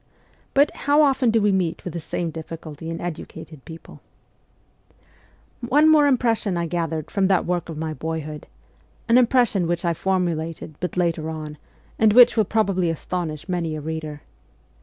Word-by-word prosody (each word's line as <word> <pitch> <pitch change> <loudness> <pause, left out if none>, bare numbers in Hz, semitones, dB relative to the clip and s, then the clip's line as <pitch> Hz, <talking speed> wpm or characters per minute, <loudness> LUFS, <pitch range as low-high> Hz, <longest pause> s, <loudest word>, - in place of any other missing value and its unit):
But, 285 +2 +4 0.2
how 295 +1 +6
often 270 -3 +3
do 225 0 +3
we 205 -1 +2
meet 180 -4 -1
with 180 - -5
the 170 - -4
same 165 +1 -3
difficulty 160 0 -8
in 165 - -4
educated 160 -3 -8
people! 165 0 -12 1.6
One 285 +6 +3
more 300 -2 +5
impression 230 -8 +1
I 170 - -1
gathered 165 -2 -3
from 195 -2 +2
that 190 -1 +2
work 175 -1 -2
of 160 - -6
my 160 0 -3
boyhood 155 -1 -5 0.6
an 235 +2 +6
impression 240 -7 +2
which 175 +1 -2
I 170 - +2
formulated 165 -3 -2
but 180 -1 -4
later 165 -3 0
on, 155 -2 -7 0.4
and 220 -2 +5
which 245 +1 +7
will 220 -2 +3
probably 195 -4 +1
astonish 165 -1 -4
many 170 -4 -2
a - - -4
reader. 155 -1 -6
175 Hz, 160 wpm, -23 LUFS, 160-210 Hz, 1.6 s, which